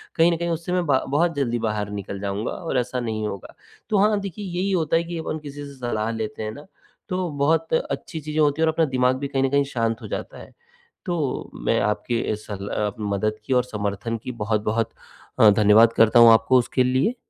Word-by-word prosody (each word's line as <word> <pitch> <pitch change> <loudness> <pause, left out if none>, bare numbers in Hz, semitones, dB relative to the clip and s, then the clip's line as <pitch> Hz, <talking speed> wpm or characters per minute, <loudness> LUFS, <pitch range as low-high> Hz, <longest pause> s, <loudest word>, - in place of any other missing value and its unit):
कहीं 165 +1 +5
न 170 - 0
कहीं 170 0 -2
उससे 170 +2 -3
मैं 180 -1 +1
बा 135 -3 +2
बहुत 165 +3 +1
जल्दी 120 -4 0
बाहर 105 -2 -2
निकल 100 0 -6
जाऊँगा 100 +3 -3
और 165 -6 -3
ऐसा 125 +1 -2
नहीं 110 -2 -2
होगा। 100 -2 -8 0.3
तो 210 - +2
हाँ, 210 +1 +3
देखिए 200 +1 -6
यही 185 +2 -2
होता 165 -3 +1
है 170 - 0
कि 170 0 -6
अपन 160 -1 -4
किसी 145 -1 -8
से 140 - -10
सलाह 115 -3 -2
लेते 110 -1 -4
हैं 110 - -3
ना, 145 +7 -11 0.4
तो 185 -1 -1
बहुत 160 +3 +1
अच्छी 160 0 -2
चीज़ें 155 +1 -2
होती 150 +1 +2
हैं 160 - +4
और 160 - +2
अपना 160 0 +2
दिमाग 125 0 +3
भी 140 - -3
कहीं 135 -1 0
न 135 - +2
कहीं 140 +1 +3
शांत 115 -2 -1
हो - - -7
जाता - - -6
है। - - -12 0.5
तो 165 -8 -2
मैं - - 0
आपकी 105 +3 -1
इस 105 0 -3
सरल 100 -1 -6
अ, 105 -1 -1
मदद 105 +1 -1
की 130 - 0
और 125 -1 +3
समर्थन 105 0 -3
की - - -4
बहुत-बहुत 110 +1 0 0.5
अ, 110 - +8
धन्यवाद 105 +3 +5
करता 115 +1 +5
हूँ 115 -1 +9
आपको 115 +3 +4
उसके 125 +2 +1
लिए। 130 - +1
125 Hz, 225 wpm, -23 LUFS, 110-160 Hz, 0.5 s, हूँ